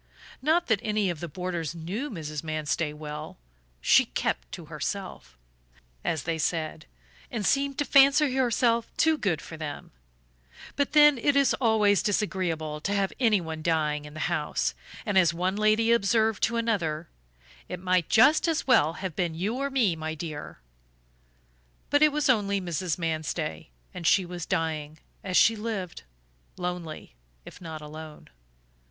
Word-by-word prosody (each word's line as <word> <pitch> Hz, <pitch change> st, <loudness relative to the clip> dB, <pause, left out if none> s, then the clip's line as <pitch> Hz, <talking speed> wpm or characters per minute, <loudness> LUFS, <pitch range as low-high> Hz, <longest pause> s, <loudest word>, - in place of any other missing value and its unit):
Not 320 Hz, +5 st, +2 dB
that 220 Hz, -4 st, +2 dB
any 210 Hz, -3 st, 0 dB
of 165 Hz, -, -7 dB
the 170 Hz, -, -5 dB
boarders 170 Hz, -1 st, -4 dB
knew 190 Hz, -, -4 dB
Mrs. 155 Hz, -, -6 dB
Manstey 155 Hz, 0 st, -2 dB
well; 150 Hz, 0 st, -8 dB, 0.4 s
she -, -, +5 dB
"kept -, -, -3 dB
to -, -, -7 dB
herself," -, -, -6 dB, 0.7 s
as 160 Hz, -, -1 dB
they 165 Hz, -1 st, -2 dB
said, 160 Hz, -1 st, -2 dB, 0.4 s
and 220 Hz, -4 st, -3 dB
seemed 275 Hz, +2 st, +1 dB
to 290 Hz, -, 0 dB
fancy 275 Hz, 0 st, +5 dB
herself 235 Hz, -2 st, +2 dB
too 320 Hz, -1 st, +4 dB
good 190 Hz, -, -1 dB
for 160 Hz, -, -9 dB
them; 155 Hz, -2 st, -7 dB, 0.8 s
but 285 Hz, 0 st, 0 dB
then 295 Hz, -3 st, +7 dB
it 285 Hz, +4 st, +2 dB
is 280 Hz, -1 st, +4 dB
always 210 Hz, -4 st, +3 dB
disagreeable 170 Hz, -7 st, -1 dB
to 200 Hz, +5 st, -1 dB
have 195 Hz, -1 st, 0 dB
anyone 180 Hz, -10 st, +1 dB
dying 150 Hz, -2 st, 0 dB
in 150 Hz, 0 st, -11 dB
the 155 Hz, -, -5 dB
house 155 Hz, -3 st, -1 dB, 0.3 s
and, 205 Hz, -4 st, +3 dB
as 170 Hz, -2 st, +3 dB
one 185 Hz, +3 st, 0 dB
lady 215 Hz, +2 st, +3 dB
observed 220 Hz, -1 st, +2 dB
to 235 Hz, +1 st, +1 dB
another: 175 Hz, -9 st, -1 dB, 0.6 s
"It 180 Hz, -, -5 dB
might 180 Hz, -2 st, +1 dB
just 290 Hz, +9 st, +5 dB
as 325 Hz, -1 st, 0 dB
well 220 Hz, -, +4 dB
have 185 Hz, -2 st, -5 dB
been 170 Hz, -2 st, -1 dB
you 205 Hz, +9 st, -2 dB
or 280 Hz, +1 st, -1 dB
me, 240 Hz, -10 st, +2 dB
my 160 Hz, 0 st, -4 dB
dear." 155 Hz, -2 st, -7 dB, 1.3 s
But 290 Hz, -, +4 dB
it 305 Hz, 0 st, +6 dB
was 300 Hz, 0 st, 0 dB
only 200 Hz, -6 st, +2 dB
Mrs. 175 Hz, -2 st, -2 dB
Manstey; 155 Hz, -, -3 dB, 0.2 s
and 170 Hz, -3 st, -3 dB
she 190 Hz, -2 st, +4 dB
was 175 Hz, -1 st, -6 dB
dying, 155 Hz, -4 st, -2 dB, 0.3 s
as 185 Hz, -2 st, 0 dB
she 225 Hz, -, +6 dB
had 215 Hz, -, -8 dB
lived, 200 Hz, -6 st, -4 dB, 0.5 s
lonely 175 Hz, -, -5 dB, 0.3 s
if -, -, -12 dB
not 160 Hz, -2 st, -7 dB
alone. 155 Hz, 0 st, -10 dB
180 Hz, 160 wpm, -27 LUFS, 160-230 Hz, 1.3 s, then